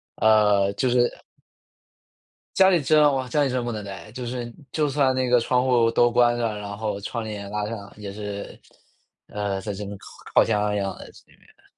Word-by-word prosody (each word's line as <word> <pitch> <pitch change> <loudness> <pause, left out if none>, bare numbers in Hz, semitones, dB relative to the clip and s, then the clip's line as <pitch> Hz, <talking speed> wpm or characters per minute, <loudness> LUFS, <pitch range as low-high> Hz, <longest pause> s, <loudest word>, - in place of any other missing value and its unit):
呃， 105 -2 +4
就 125 +5 0
是 120 0 +1 1.3
家 190 0 +6
里 175 -4 +3
真 150 +2 +4
哇， 130 -1 -3
家 150 +3 +1
里 135 - 0
真 125 -1 -1
不 120 - -3
能 105 -2 -5
待。 100 +2 -9
就 125 0 -6
是 120 -1 -5 0.2
就 150 -2 +1
算 135 -2 +2
那 130 -1 0
个 120 -1 +4
窗 125 +2 +1
户 120 -3 +3
都 120 +1 +3
关 120 0 +3
上， 115 -3 -1
然 100 0 -6
后 105 -2 -3
窗 115 +3 -4
帘 105 -2 -6
拉 105 0 -2
上 100 -3 -7
也 100 -2 -7
是 105 -1 -7 0.7
呃， 100 -2 -3
在 105 0 -5
这 105 +1 -6
边 100 0 -7
烤 - - -16 0.3
烤 - - +6
箱 105 -1 0
一 - - 0
样 100 -1 -3
的， - - -11
这 - - -18
边。 - - -26
110 Hz, 225 characters per minute, -24 LUFS, 105-125 Hz, 1.3 s, 家